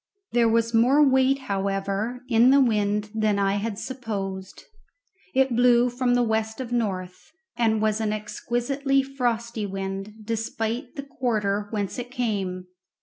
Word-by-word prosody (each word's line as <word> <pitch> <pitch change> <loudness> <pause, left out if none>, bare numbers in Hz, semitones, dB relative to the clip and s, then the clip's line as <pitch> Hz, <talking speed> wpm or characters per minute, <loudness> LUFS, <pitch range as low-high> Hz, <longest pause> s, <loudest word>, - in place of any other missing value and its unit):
There 235 -1 +3
was 230 +1 +1
more 265 +6 +5
weight, 265 +1 +3
however, 200 +3 -2
in 235 0 +5
the 275 +1 +6
wind 210 -4 +1
than 215 -2 +1
I 200 0 +1
had 205 0 -3
supposed. 200 -7 -5 0.7
It 265 -2 +3
blew 245 0 +4
from 245 0 +1
the 245 - +3
west 220 0 -1
of 250 -2 -5
north, 185 -6 -3 0.2
and 220 -2 +1
was 215 0 +1
an 215 -1 0
exquisitely 255 +6 -1
frosty 235 -5 -2
wind, 195 +1 -5
despite 225 +4 -3
the 280 - -5
quarter 215 -7 -1
whence 205 +1 -3
it 245 0 -5
came. 200 -7 -2
225 Hz, 145 wpm, -25 LUFS, 205-245 Hz, 0.7 s, the